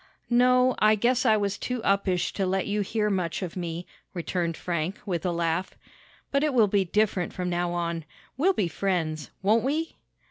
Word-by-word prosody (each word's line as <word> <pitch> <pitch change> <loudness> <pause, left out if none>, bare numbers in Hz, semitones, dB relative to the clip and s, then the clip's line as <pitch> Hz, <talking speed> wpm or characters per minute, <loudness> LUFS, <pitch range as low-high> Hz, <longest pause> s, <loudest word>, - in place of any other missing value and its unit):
"No, 250 +1 +5
I 215 0 +5
guess 245 +4 +2
I 215 -1 +5
was 200 -1 -1
too 250 -1 -3
uppish 195 -2 +1
to 195 -2 -1
let 190 +1 0
you 205 +1 0
hear 210 +1 0
much 180 -2 -1
of 175 - -5
me," 175 -1 -4 0.3
returned 170 -1 -2
Frank, 175 +2 -2
with 180 -3 -2
a - - +1
laugh. 170 +1 -1 0.5
"But 280 +1 +2
it 300 -3 +1
will 225 -4 +5
be 200 0 +2
different 200 -1 0
from 180 -1 -3
now 175 0 0
on. 170 -2 -2 0.3
We'll 360 +9 +3
be 200 - 0
friends; 160 -5 -2
won't 215 +4 +3
we?" 310 +5 -2
195 Hz, 185 wpm, -26 LUFS, 175-220 Hz, 0.5 s, No